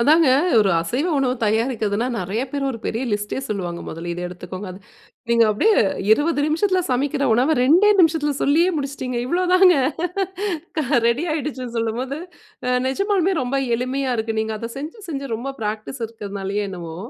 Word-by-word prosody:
அதாங்க. 305 +4 +5 0.3
ஒரு 200 -2 +4
அசைவ 250 - -1
உணவு 255 -2 +1
தயாரிக்கிறதுனா 220 0 0
நிறைய 190 +5 -2
பேர் 280 0 -2
ஒரு 230 - -6
பெரிய 230 +3 -2
லிஸ்ட்டே 205 +4 -2
சொல்லுவாங்க. 180 -6 -4
முதல்ல 170 +2 -6
இத 175 - -5
எடுத்துக்கோங்க, 180 +2 -8
அது 185 - -11 0.5
நீங்க 230 -1 +5
அப்பிடியே 415 - +3 0.4
20 295 +4 +2
நிமிஷத்தில 370 +4 +2
சமைக்கிற 280 +3 0
உணவ 260 +7 +3
2டே 355 +11 +5
நிமிஷத்தில 315 -3 +3
சொல்லியே 325 +6 +4
முடிச்சுட்டீங்க. 275 -3 -4
இவ்ளோதாங்க. 365 +2 +4 1.0
க - - +3 0.3
ரெடி 245 +8 +1
ஆயிடுச்சுன்னு 260 -5 -4
சொல்லும்போது, 250 +6 -2 0.5
அ - - +1 0.2
நிஜமாலுமே 390 +5 +1
ரொம்ப 265 +2 -1 0.2
எளிமைய 255 +1 -1
இருக்கு. 220 0 -2
நீங்க 220 0 -2
அத 230 +1 -5
செஞ்சு, 310 +10 -7
செஞ்சு 275 -3 -4
ரொம்ப 245 +5 -4
பிராக்டிஸ் 215 +4 -4
இருக்கனாலயோ 205 -2 -4
என்னவோ! 170 -3 -7
255 Hz, 150 wpm, -21 LUFS, 215-300 Hz, 1.0 s, அதாங்க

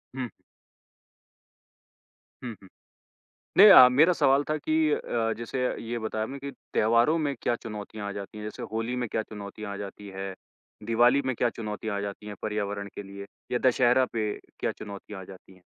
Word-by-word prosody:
हुँ। 130 -2 -3 2.1
हुँ, 120 - -4
हुँ। 95 - -15 0.9
नहीं 210 +2 +10
अ, 130 -10 +11
मेरा 155 +8 +5
सवाल 140 -3 +3
था 155 - +1
कि 155 +1 -2 0.2
अ - - +3
अ, 115 -1 -1
जैसे 115 +3 -4 0.2
ये 120 +1 -3
बताया 110 0 -2
आपने 135 +5 -6
कि 140 +1 -6 0.2
त्योहारों 115 +8 +4
में 145 -3 -1
क्या 120 - +1
चुनौतियाँ 105 -2 -7
आ - - -3
जाती 100 +1 -7
हैं? 105 - -6
जैसे 105 - -6
होली 115 +3 -2
में - - -2
क्या 110 - -1
चुनौतियाँ 105 0 -7
आ - - -5
जाती 100 +1 -8
हैं? 95 0 -4 0.5
दिवाली 120 +4 +4
में 130 -1 0
क्या 120 - +2
चुनौतियाँ 110 -1 -5
आ - - -2
जाती 100 +1 -6
हैं 105 - -6
पर्यावरण 100 -1 -3
के - - -6
लिए 100 0 -9 0.3
या 125 - +2
दशहरा 125 +1 +4
पे 110 -2 0 0.3
क्या - - 0
चुनौतियाँ 100 -1 -8
आ - - -8
जाती 95 0 -14
हैं? 95 - -22
110 Hz, 185 wpm, -27 LUFS, 100-125 Hz, 2.1 s, अ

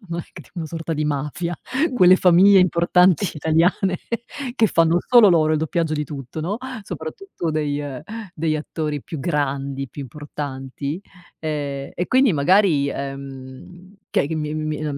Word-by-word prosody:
non 170 0 -3
è - - -12
c - - -17
una 170 -3 -4
sorta 165 +1 -4
di 150 0 -1
mafia 150 +4 -2 0.4
quelle 185 -5 +7
famiglie 190 +2 +6
importanti 180 0 +3
italiane 170 +4 +1 0.6
che 225 - +4
fanno 165 -3 +3
solo 240 -4 +7
loro 160 -3 +3
il 155 - +2
doppiaggio 160 0 -1
di 150 -1 -1
tutto, 140 0 -7
no, 180 +7 -2 0.3
soprattutto 175 - -5
degli, 150 -2 -1
ehm, 140 -3 -5 0.3
degli 155 -1 0
attori 150 -1 -4
più 160 - -7
grandi, 140 -3 -2
più 145 - -8
importanti, 140 +1 -6 0.4
ehm, 145 -3 -3
e 180 - -2
quindi 260 -3 +4
magari, 155 -1 +3
ehm, 140 +7 -8
che - - +1
che 160 - -3
mi 150 -1 -3
mi 155 0 -3 0.2
mi 155 - -3
155 Hz, 155 wpm, -22 LUFS, 145-175 Hz, 0.6 s, quelle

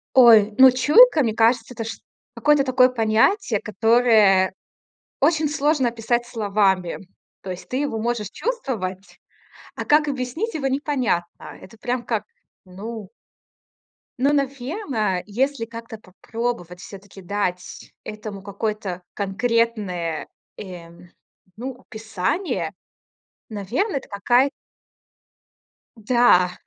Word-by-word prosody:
Ой, 220 -4 +7
ну 260 -1 +9
чуйка, 300 - +6
мне 220 -2 0
кажется, 230 +2 +2
это, 225 -1 -5
чт 225 - -7 0.3
какое-то 295 -2 +3
такое 255 0 +4
понятие, 225 - +1
которое 215 -3 +3 0.7
очень 310 +1 +2
сложно 295 -3 +1
описать 235 +1 -1
словами. 195 -5 0 0.4
То 190 - -7
есть 180 - -8
ты 255 - -3
его 280 -5 -1
можешь 220 -3 -2
чувствовать, 205 - -4 0.6
а - - -5
как 300 0 +3
объяснить 280 - -3
его 285 -3 -2
непонятно. 260 - -2
Это 210 +4 -14
прям 245 +1 -3
как, 215 -3 -2 0.4
ну 205 +2 -8 1.1
ну, 280 +3 +2
наверно, 270 - -2
если 250 +3 -1
как-то 230 -1 -9
попробовать 200 -2 -5
всё-таки 195 0 -12
дать 180 -1 -4
этому 215 -2 -8
какое-то 200 -2 -4
конкретное, 200 -5 -1 0.3
эм, 175 -2 -11 0.5
ну, 260 +4 -5
описание, 220 - -3 0.8
наверное, 235 - -2
это - - -16
какая 240 +7 +2 1.5
Да. 220 -5 +3
225 Hz, 105 wpm, -22 LUFS, 200-260 Hz, 1.5 s, ну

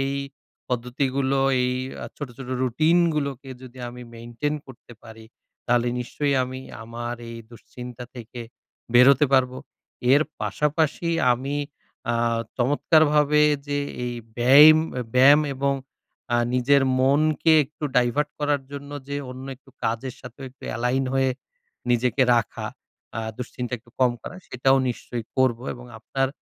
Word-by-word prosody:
এই 135 0 0 0.6
পদ্ধতিগুলো 130 +2 -1 0.2
এই 125 0 +1 0.3
আ - - -5
ছোট, 145 - -5
ছোট 135 -2 -9
রুটিন 155 +8 +3 0.2
গুলোকে 140 -3 -3
যদি 130 0 -12
আমি 125 +1 -10
মেইনটেইন 120 +6 -3
করতে 125 -2 -14
পারি 110 -1 -12 0.4
তাহলে 120 0 +2
নিশ্চয়ই 140 +3 -1
আমি 130 +1 -5 0.2
আমার 120 +1 -5
এই 115 - -7
দুশ্চিন্তা 125 +1 -10
থেকে 120 0 -9 0.5
বেরোতে 135 +3 +7
পারবো। 130 -1 +3 0.6
এর 145 +2 +6 0.2
পাশাপাশি 150 - 0 0.2
আমি 135 +4 -3 0.6
আ - - 0 0.4
চমৎকারভাবে 150 +3 +3 0.2
যে 145 0 -1 0.3
এই 120 - -3 0.3
বেইম 145 +6 +8 0.2
অ্যা 125 - -2
ব্যায়াম 140 +4 +7
এবং 140 +1 0 0.6
আ - - +4 0.2
নিজের 135 +2 +4 0.2
মনকে 150 +4 +3
একটু 150 +2 -9
ডাইভার্ট 125 +4 +2
করার 145 -1 +1
জন্য 140 0 -7 0.2
যে 140 - -3
অন্য 130 +1 -8
একটু 135 0 -22
কাজের 115 +3 -2
সাথে 125 +2 -12
একটু 130 - -28
এলাইন 125 +3 0
হয়ে 135 0 +2 0.6
নিজেকে 125 +2 +2
রাখা, 115 -1 -1 0.5
আ - - -1 0.2
দুশ্চিন্তা 125 0 -5
একটু 120 +2 -24
কম 125 -1 +5
করা, 180 - -8
সেটাও 135 +2 +3
নিশ্চয়ই 120 -1 -5
করব 130 -3 +3 0.2
এবং 125 0 -12
আপনার 135 +4 -1
130 Hz, 135 wpm, -24 LUFS, 120-140 Hz, 0.6 s, বেইম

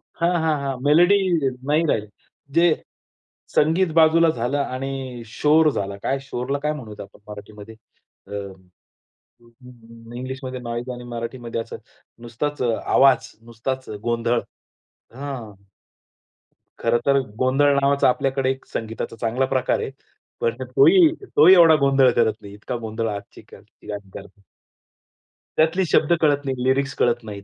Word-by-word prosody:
हां, 170 +1 +1
हां, 155 -2 +1
हां. 135 -2 -3
मेलडी 175 +7 +5 0.5
नाही 155 +3 +2
राहिली. 110 -8 0 0.5
जे 170 +1 +4 0.9
संगीत 165 +5 +3
बाजूला 165 +1 +5
झालं 125 0 -1
आणि 130 -2 -4
शोर 155 +7 +3
झाला. 100 -4 -4
काय, 135 - 0
शोरला 135 +1 -4
काय 150 0 0
म्हणू 115 -8 -9
आपण 100 - -17
मराठीमध्ये 105 +1 -11 0.5
अ, - - -15 1.8
इंग्लिशमध्ये 130 0 -6
नॉईज 120 +1 -5
आणि 125 0 -9
मराठीमध्ये 115 0 -5
असं - - -8 0.4
नुसताच 130 +5 -4
आवाज, 125 +2 +3 0.2
नुसताच 130 +3 -5
गोंधळ. 120 0 0 0.8
हां. 130 -5 -7 1.3
खरं 115 0 +1
तर 140 0 +4 0.2
गोंधळ 135 +3 +3
नावाचा 140 -1 +3
आपल्याकडे 135 +1 0
एक 135 - -8
संगीताचा 115 +1 -5
चांगला 120 +3 0
प्रकार 130 -1 +1
आहे. - - -4 0.5
पण 470 0 -1
तोही, 360 -5 +5 0.2
तोही 165 +5 +8
एवढा 165 -3 +7
गोंधळ 135 -2 +4
करत 115 -2 +2
नाही. 100 0 -11
इतका 105 +4 -6
गोंधळ 115 0 -4
आजची 100 -1 -8
ती - - -18
गाणी 100 -2 -7
करतात. 100 +1 -12 1.2
त्यातली 165 +4 +2
शब्द 155 - +3
कळत 145 -2 +2
नाहीत, 130 -1 -2
लिरिक्स 135 +1 +1
कळत 120 -1 +1
नाहीत. 100 -2 -8
130 Hz, 130 wpm, -22 LUFS, 115-145 Hz, 1.8 s, तोही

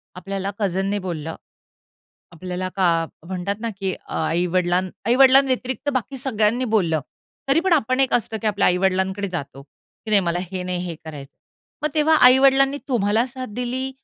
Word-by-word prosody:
आपल्याला 195 +1 -4
कझीनने 195 +1 -1
बोललं. 165 -4 -5 1.0
आपल्याला 180 +2 -5
का 190 -2 +3 0.4
म्हणतात 185 +2 -3
ना, 230 - -2
की 190 -2 -1
अ, - - -14
आई-वडिलां 175 +2 +1 0.2
आई-वडिलांव्यतिरिक्त 260 +1 +3
बाकी 255 +2 -2
सगळ्यांनी 240 -1 0
बोललं, 165 -6 +1 0.5
तरी 290 +4 +4
पण 375 -1 0
आपण 255 -3 +2
एक 265 - +2
असतं 225 -1 0
की - - -2
आपल्या 205 -1 +2
आई-वडिलांकडे 190 +2 +1
जातो. 140 -6 -6
की 215 +9 -15
नाही, 205 -2 +5
मला 170 0 -1
हे 185 -1 -4
नाही 180 -1 -3
हे 170 - -4
करायचं. 145 -2 -9 0.5
मग 300 - +1
तेव्हा 310 +1 +4
आई-वडिलांनी 270 +2 +5
तुम्हाला 225 0 +1
साथ 255 0 -7
दिली, 255 +2 -3
200 Hz, 155 wpm, -22 LUFS, 180-255 Hz, 1.0 s, नाही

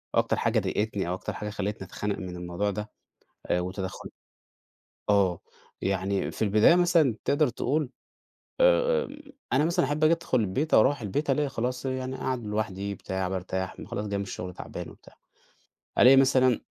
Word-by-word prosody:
أكتر - - +2
حاجة - - +2
ضايقتني 105 -3 -1
أو - - 0
أكتر 95 - -4
حاجة 105 - -5
خلّتني 100 -1 -4
أتخنق 105 -1 -3
من 90 -1 -6
الموضوع 90 +4 -2
ده. 105 +2 -5 0.6
آآ 90 - +1
وتدخل 95 +1 -5 1.0
آه 95 -4 +3 0.4
يعني 95 0 -1
في - - -10
البداية 105 - +5
مثلًا 170 - +3
تقدر 145 +1 +3
تقول 140 +3 -1 0.7
آآ - - +4 0.4
أنا 135 +3 +4
مثلًا 170 -1 +2
أحب 145 +3 0
آجي 155 - +5
أدخل 165 -7 +1
البيت 120 +10 0
آو - - +8
أروح 140 +5 +2
البيت 140 +9 -1
ألاقي 145 +2 +1
خلاص 125 +1 -3
يعني 130 0 -3
أقعد 130 -3 -3
لوحدي 100 -2 -2
بتاع 95 -1 -3
بارتاح 95 0 -4
خلاص 105 - -4
جاي 100 -1 -2
من 100 - -2
الشغل 90 -2 -6
تعبان - - -7
وبتاع. - - -17 0.9
ألاقي 130 +2 +8
مثلًا 130 -3 +4
110 Hz, 160 wpm, -27 LUFS, 95-135 Hz, 1.0 s, آو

